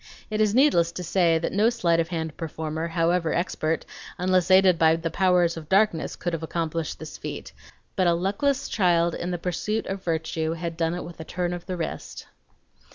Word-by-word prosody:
It 215 0 0
is 215 0 +2
needless 210 - +4
to 180 - -5
say 170 -1 +3
that 160 - -2
no 210 +4 +3
sleight 170 -8 +1
of 165 - +1
hand 160 -3 -4
performer, 160 0 -4
however 165 0 +1
expert, 165 -2 -1 0.3
unless 185 0 +1
aided 185 -2 +6
by 160 0 +5
the 165 0 -3
powers 180 -3 +2
of 155 -2 -9
darkness, 195 -4 +2
could 175 - -3
have 165 - -2
accomplished 165 -1 -3
this - - -9
feat; - - -7 0.4
but 185 -3 +2
a 170 - +4
luckless 205 +10 0
child 175 -4 +2
in 175 - -4
the 175 - -2
pursuit 185 +6 -2
of 195 0 -5
virtue 160 -1 -1
had 165 0 -4
done 165 0 0
it 175 - -5
with 170 -1 -10
a - - -5
turn 175 +1 -3
of 175 0 -7
the 185 -1 -3
wrist. 165 - -5
170 Hz, 200 wpm, -25 LUFS, 165-185 Hz, 0.4 s, aided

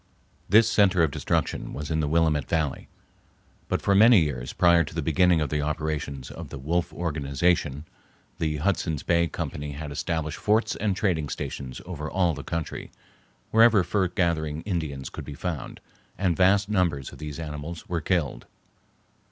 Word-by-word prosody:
This 110 +4 +6
center 95 -6 +4
of 80 - +2
destruction - - -1
was 75 +2 -5
in 80 - +1
the 75 - 0
Willamette 80 -2 +1
Valley. 80 -4 -1 0.8
But - - -1
for 100 - +3
many 110 +2 +7
years 65 -5 -2
prior 85 -1 +4
to 75 - -9
the 80 - 0
beginning 85 +2 +3
of 75 - -2
the 75 -1 0
operations 75 -3 -3
of - - -8
the - - -7
"Wolf 85 +6 -1
Organization" 75 -1 0 0.5
the 75 -2 0
Hudson's 80 -2 -1
Bay 85 0 +2
Company 75 -2 -5
had 75 +1 -6
established 75 0 -3
forts 110 +2 +2
and 100 -2 0
trading 85 -7 0
stations 65 -2 -5
over 80 -4 -5
all 90 -3 +1
the 70 -1 -7
country, 85 -2 -4 0.6
wherever 115 -3 +6
fur 95 +1 +1
gathering 80 -4 -1
Indians 80 -9 -3
could - - -7
be 75 - -8
found, 85 -2 -5 0.4
and 90 -3 +1
vast 95 +3 +4
numbers 85 -10 0
of - - -13
these 75 -2 -6
animals 80 +1 -6
were 85 -2 -2
killed. 75 -9 -1
80 Hz, 165 wpm, -26 LUFS, 75-90 Hz, 0.8 s, many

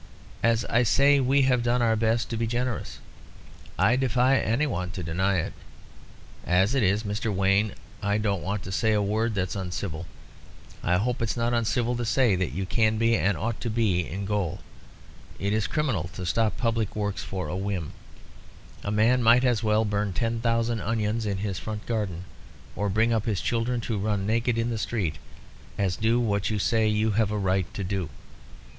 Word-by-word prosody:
As 115 0 +2
I 120 - +2
say, 140 +4 +4
we've 130 -1 +3
done 120 +1 +1
our 115 -1 +3
best 110 0 +1
to - - -1
be 115 0 -1
generous; 120 0 -3 0.8
I 110 +7 +4
defy 130 +1 +3
any 115 +7 +1
one 90 - -2
to 90 - -5
deny 95 +5 0
it. 85 - -2 0.9
As 95 +6 +2
it 135 - +2
is, 105 +1 +2
Mr. 105 +2 -2
Wayne, 100 +2 +2 0.3
I 100 0 +1
don't 100 -4 -1
want 100 +2 -3
to 95 - -7
say 110 +3 +1
a 105 - +2
word 110 +2 0
that's 95 -1 -1
uncivil. 90 -3 -4 0.7
I 90 +1 +2
hope 120 +5 -1
it's 115 +1 -1
not 120 +1 0
uncivil 120 +1 +1
to 120 - -2
say 120 -2 +3
that 90 -2 -1
you 95 +5 -3
can 110 +2 +1
be, 115 +1 +3
and 100 -4 +1
ought 115 +1 -3
to 120 - -2
be, 105 -7 +1
in 100 +4 -4
gaol. 100 -4 -2 0.8
It 100 +1 -1
is 110 -1 +1
criminal 125 - -1
to 90 - -5
stop 110 +4 +1
public 115 -2 -1
works 105 -2 -2
for 95 -4 -4
a 75 - -4
whim. 95 -5 -3 0.9
A - - -3
man 110 +4 +3
might 120 +2 +5
as 120 -5 +2
well 110 0 +2
burn 105 -1 -1
ten 115 +5 -1
thousand 115 -1 0
onions 110 0 -1
in 100 -1 -1
his 95 -2 -3
front 105 +4 -6
garden 105 -7 -2 0.5
or 105 0 -1
bring 110 +4 +2
up 110 -2 0
his 105 -5 0
children 120 +4 -1
to 110 -2 -2
run 100 -1 -1
naked 115 +2 +1
in 115 +1 0
the 115 - -2
street, 95 -10 -2 0.6
as 95 -3 0
do 115 +4 +2
what 100 -4 0
you 110 - -1
say 110 +2 +2
you 105 +1 +1
have 105 0 +1
a 105 - -2
right 95 -3 0
to 100 - -3
do. 95 -3 -2
110 Hz, 195 wpm, -26 LUFS, 100-115 Hz, 0.9 s, might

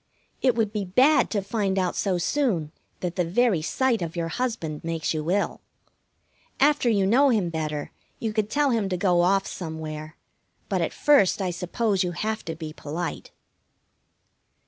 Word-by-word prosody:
It 255 -2 +3
would 220 -3 0
be 210 -2 -1
bad 255 +12 +4
to 205 -3 -1
find 200 -2 -1
out 185 -2 0
so 190 -3 0
soon 175 - 0 0.3
that 180 -1 -3
the 180 - +3
very 190 +1 +2
sight 245 +6 +1
of 165 0 -4
your 165 -1 -2
husband 170 -9 -3
makes 165 -1 -2
you 155 +1 -3
ill. 200 +3 0 1.0
After 290 -3 +4
you 200 -4 +2
know 260 +8 +5
him 205 -8 +1
better, 155 -2 -3 0.3
you 220 -2 -3
could 215 -1 0
tell 290 +2 +2
him 220 -5 0
to 180 - -1
go 175 -1 +3
off 195 +2 +3
somewhere; 155 -2 -6 0.5
but - - 0
at - - 0
first 285 -12 +4
I 185 -2 -1
suppose 190 +3 0
you 175 -1 -2
have 220 +4 -2
to 165 - -4
be 155 -1 -7
polite. 160 +2 -5
190 Hz, 170 wpm, -25 LUFS, 165-225 Hz, 1.0 s, know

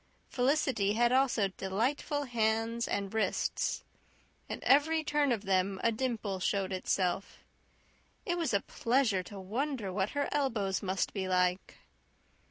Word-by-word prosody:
Felicity 250 -6 +1
had 240 +2 +3
also 255 -6 +3
delightful 235 +10 -1
hands 230 -1 0
and 200 0 -2
wrists. 220 - 0 0.7
At - - -5
every 315 +3 +4
turn 295 -2 +1
of 215 -3 -1
them 190 0 +1
a 230 - +4
dimple 220 -5 -2
showed 195 0 0
itself. 185 +1 -1 0.8
It 350 - 0
was 335 -2 -1
a 200 -2 +2
pleasure 230 -5 +1
to 195 +2 -9
wonder 225 +1 -3
what 190 +1 0
her 285 - +1
elbows 225 -10 0
must 190 -1 -1
be 190 -2 -2
like. 180 0 0
220 Hz, 135 wpm, -31 LUFS, 195-265 Hz, 0.8 s, every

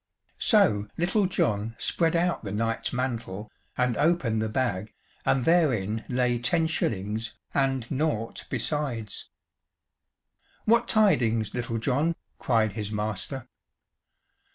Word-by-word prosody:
So 145 - +4
Little 185 +4 +2
John 110 - 0
spread 165 -1 +1
out 175 -3 +1
the 100 - -4
knight's 115 +2 -1
mantle, 115 -5 -3 0.3
and 125 -1 +2
opened 145 -8 +2
the 110 - -1
bag, 110 -4 -2 0.3
and 130 -2 +3
therein 120 - +2
lay 125 -1 +1
ten 165 +7 +2
shillings 110 - -1 0.2
and 135 -3 +1
naught 130 -6 -1
besides. 130 -9 -2 1.4
"What 235 +2 +4
tidings, 115 - +3
Little 120 -2 -2
John?" 140 +8 +1 0.2
cried 110 -3 +2
his 105 0 -4
master. 110 +5 -2
120 Hz, 110 wpm, -27 LUFS, 110-155 Hz, 1.4 s, So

